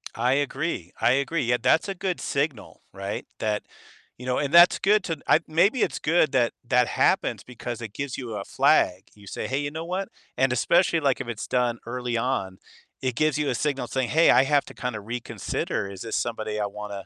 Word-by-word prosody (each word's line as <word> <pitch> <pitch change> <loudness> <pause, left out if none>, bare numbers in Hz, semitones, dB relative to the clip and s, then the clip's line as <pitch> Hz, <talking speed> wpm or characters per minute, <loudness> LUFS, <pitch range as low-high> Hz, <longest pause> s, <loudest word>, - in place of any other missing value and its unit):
I 125 +3 +2
agree, 140 - -2
I - - +4
agree, 140 +4 0
yeah, 120 0 +2
that's 130 - +3
a 195 - -3
good 180 0 -2
signal, 140 -6 -3
right? 100 +1 -5
That 105 -1 -1 0.5
you 125 - -9
know, 125 - +1
and 145 +2 -2
that's 175 +1 +8
good 205 0 +3
to 165 -2 -2
I - - +5
maybe 190 +10 +2
it's - - 0
good 160 -2 +2
that 120 -3 +3 0.2
that 125 0 +3
happens - - +1
because 120 -1 -7
it 110 -3 -7
gives 140 0 -4
you 120 -4 -6
a 100 - -4
flag. 90 +1 +2
You 105 -1 -16
say, - - -5
"Hey, 130 +2 -1
you 145 0 -3
know 160 +2 -5
what?" 185 +3 -3 0.3
And 130 -1 +2
especially, 170 +8 +3
like, 140 -4 +1
if 130 - -6
it's 120 -2 -5
done 120 -2 0
early 125 -1 -2
on, 100 -7 -2 0.4
it 130 -2 -1
gives 155 +2 +1
you 150 - 0
a - - 0
signal 140 +1 -1
saying, 130 -3 -1
"Hey, 160 +2 +5
I - - +6
have 140 +1 +2
to - - -12
kinda 125 -4 -4
reconsider, 115 -3 -4
is 95 -1 -9
this 115 - -4
somebody 110 -2 -2
I 105 - 0
wanna, 100 -1 -7
125 Hz, 215 wpm, -25 LUFS, 115-150 Hz, 0.5 s, that's